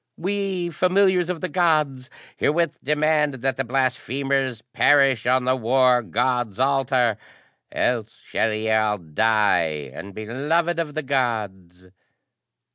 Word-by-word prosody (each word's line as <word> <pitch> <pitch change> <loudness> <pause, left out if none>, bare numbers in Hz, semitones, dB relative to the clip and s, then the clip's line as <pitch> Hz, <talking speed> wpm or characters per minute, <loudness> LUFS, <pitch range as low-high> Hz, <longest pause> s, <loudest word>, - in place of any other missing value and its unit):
"We, 190 -1 -2
familiars 185 0 +2
of 180 -3 -3
the 185 - -2
Gods, 150 -7 0 0.3
herewith 165 +1 -1
demand 150 0 +1
that 135 -1 +1
the 135 - -2
blasphemers 130 -1 -1
perish 135 -5 +3
on 130 0 +2
the 130 0 +2
War 125 +1 +3
God's 120 +2 -1
altar! 130 -4 +1 0.5
Else 115 -3 -2
shall 110 - -1
ye 110 +1 -2
all 110 -1 +2
die 85 -5 0
unbeloved 135 - -2
of 150 -3 -3
the 155 - -2
Gods!" 105 -9 -3
130 Hz, 120 wpm, -22 LUFS, 110-150 Hz, 0.5 s, perish